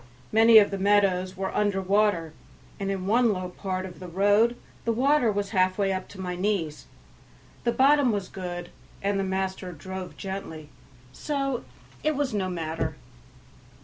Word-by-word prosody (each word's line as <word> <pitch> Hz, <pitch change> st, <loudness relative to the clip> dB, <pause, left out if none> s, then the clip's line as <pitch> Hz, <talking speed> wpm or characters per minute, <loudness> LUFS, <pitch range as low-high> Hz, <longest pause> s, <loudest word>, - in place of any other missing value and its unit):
Many 225 Hz, +1 st, +7 dB
of 205 Hz, -2 st, +6 dB
the 195 Hz, -, -3 dB
meadows 190 Hz, -2 st, +2 dB
were 190 Hz, 0 st, -3 dB
under 205 Hz, -2 st, +1 dB
water, 190 Hz, -4 st, +1 dB, 0.5 s
and 195 Hz, -1 st, -2 dB
in 190 Hz, -2 st, -2 dB
one 230 Hz, +3 st, +3 dB
low 185 Hz, -2 st, -3 dB
part 185 Hz, 0 st, -4 dB
of 180 Hz, -2 st, -10 dB
the 185 Hz, -, -8 dB
road 205 Hz, +6 st, +3 dB, 0.3 s
the 230 Hz, -, +1 dB
water 255 Hz, 0 st, +3 dB
was 200 Hz, -1 st, -2 dB
halfway 190 Hz, 0 st, +2 dB
up 185 Hz, -, -4 dB
to 195 Hz, -, -13 dB
my 180 Hz, -1 st, -3 dB
knees; 180 Hz, -5 st, -2 dB, 0.8 s
the 235 Hz, -, +3 dB
bottom 275 Hz, 0 st, +4 dB
was 200 Hz, -3 st, -2 dB
good, 175 Hz, -2 st, -6 dB, 0.3 s
and 195 Hz, -1 st, 0 dB
master 190 Hz, -1 st, -2 dB
drove 185 Hz, +3 st, -7 dB
gently, 175 Hz, -6 st, -6 dB, 0.4 s
so 275 Hz, -4 st, -2 dB, 0.4 s
it 310 Hz, 0 st, +1 dB
was 275 Hz, -4 st, -1 dB
no 190 Hz, -3 st, -1 dB
matter. 165 Hz, -2 st, -3 dB
195 Hz, 155 wpm, -26 LUFS, 185-215 Hz, 0.8 s, Many